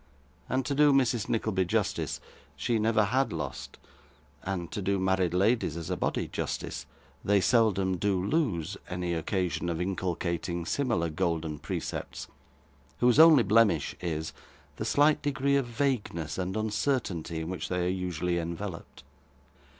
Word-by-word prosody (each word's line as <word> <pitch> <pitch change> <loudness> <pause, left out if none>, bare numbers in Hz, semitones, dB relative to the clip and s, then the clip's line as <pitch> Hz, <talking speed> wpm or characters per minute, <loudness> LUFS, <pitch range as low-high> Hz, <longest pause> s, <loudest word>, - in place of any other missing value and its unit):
And 130 0 0
to 145 - -1
do 145 +1 +5
Mrs. 125 -5 +2
Nickleby 110 -4 +1
justice, - - -1 0.4
she 115 -2 0
never 110 0 +3
had 130 +6 +1
lost 75 -5 -5 0.6
and 90 -3 -4
to 105 - -3
do 100 +1 +1
married 95 -2 +1
ladies 100 -4 +2
as 85 - -5
a - - +1
body - - -1
justice, - - -4 0.4
they 100 0 +3
seldom 95 -4 +2
do 100 0 +1
lose 100 - -1
any 90 -1 -2
occasion 85 +1 -1
of 85 -1 -2
inculcating 85 -1 -2
similar 120 - 0
golden 80 -1 -1
percepts, - - -5 0.7
whose 125 +3 +4
only 160 -6 +8
blemish 105 -7 +3
is, 80 -2 -3 0.4
the - - -3
slight 145 +1 +3
degree 140 -1 +1
of 135 -3 +1
vagueness 115 - -2
and 95 +3 -2
uncertainty 105 - -1
in 80 - -5
which 95 - -4
they 90 -1 0
are - - +1
usually 90 -1 -1
enveloped. 85 +2 -6
95 Hz, 140 wpm, -29 LUFS, 85-115 Hz, 0.7 s, only